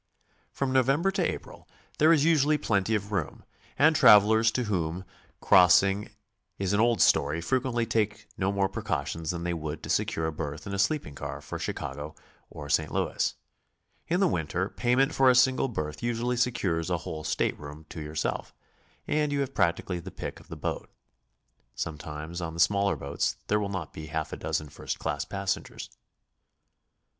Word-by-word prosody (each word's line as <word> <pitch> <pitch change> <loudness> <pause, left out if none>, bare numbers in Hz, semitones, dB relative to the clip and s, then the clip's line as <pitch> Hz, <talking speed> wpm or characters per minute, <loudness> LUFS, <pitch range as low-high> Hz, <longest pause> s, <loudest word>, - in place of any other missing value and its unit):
From 135 -1 -2
November 135 +8 +3
to 195 - 0
April - - -10 0.3
there 155 +2 +6
is 155 -3 +4
usually 155 -2 +4
plenty 105 -4 +1
of 105 0 -3
room, 95 -8 -3 0.3
and 155 +2 +5
travelers 110 -3 +7
to 125 - 0
whom 90 -4 -2 0.4
crossing 95 +3 +5 0.5
is 95 0 -1
an 100 - +2
old 120 +1 +4
story 75 +3 +3
fre 130 +10 +1
quently 120 -3 -1
take 105 -1 -1
no 95 0 0
more 100 -1 +1
precautions 80 -3 -3
than 85 -1 -2
they 85 0 -1
would 80 -2 -5
to - - -3
secure 80 - 0
a 80 - -1
berth 75 -1 -6
in 100 - -5
a 100 - -2
sleeping 100 - 0
car - - -6
for - - -7
Chicago 75 +2 -5 0.3
or 75 - -8
St. 80 +1 +1
Louis. - - -1 0.7
In 175 +2 +1
the 195 - +4
winter, 90 - -1
payment 125 +4 +1
for 135 -1 +5
a 125 - +5
single 130 +1 +4
berth 75 - -4
usually 120 +1 -1
secures 95 -9 0
a 90 - +1
whole 80 0 -5
stateroom 75 0 -3
to 80 - -7
yourself, 75 +1 -3 0.5
and 150 -1 +1
you 140 -1 0
have 135 0 -3
practically 85 +1 0
the 90 +3 -8
pick - - -7
of - - -18
the - - -7
boat. - - -4 0.9
Sometimes 80 +2 -5
on 80 -1 -4
the - - -7
smaller 100 +4 +3
boats 70 +1 -2
there 105 - +3
will 100 -1 -2
not 95 -6 -5
be 80 0 -8
half 80 0 -3
a - - -4
dozen 75 - -3
first - - -5
cabin 75 -1 -2
passengers. 100 -1 -4
100 Hz, 175 wpm, -28 LUFS, 80-125 Hz, 0.9 s, travelers